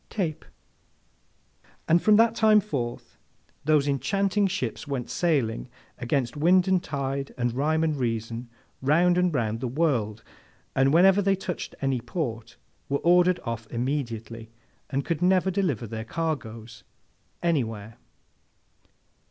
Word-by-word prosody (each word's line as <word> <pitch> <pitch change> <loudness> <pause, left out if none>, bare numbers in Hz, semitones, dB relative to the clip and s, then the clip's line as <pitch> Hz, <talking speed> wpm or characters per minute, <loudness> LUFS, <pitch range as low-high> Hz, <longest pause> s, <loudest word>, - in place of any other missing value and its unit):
—Tape!' 170 -8 -3 1.4
And 170 +1 +4
from 215 - +5
that 225 +1 +5
time 220 -2 +5
forth, 125 - -5 0.5
those 150 -1 +3
enchanting 195 - +1
ships 190 -4 -4
went 135 -4 -4
sailing, 135 -9 0 0.3
against 125 0 -1
wind 180 +5 +4
and 185 -2 +2
tide 140 -1 -3
and 120 -1 0
rhyme 155 +5 +1
and 155 -2 +1
reason, 115 -1 -3 0.3
round 170 +6 +3
and 180 0 +2
round 115 -6 -1
the 130 - -3
world, 120 -7 0 0.5
and 135 +1 +3
whenever 190 +5 +5
they 195 0 +2
touched 180 -2 -5
at - - -14
any 135 -3 0
port 115 -3 -5 0.3
were 140 - +1
ordered 180 +1 +4
off 115 -2 -5
immediately, 115 -3 -4 0.4
and 135 0 -2
could 170 -1 -2
never 185 +1 +3
deliver 175 - -1
their 110 0 -5
cargoes 115 -7 -4 0.6
anywhere. 115 -9 -1
140 Hz, 130 wpm, -26 LUFS, 120-175 Hz, 1.4 s, from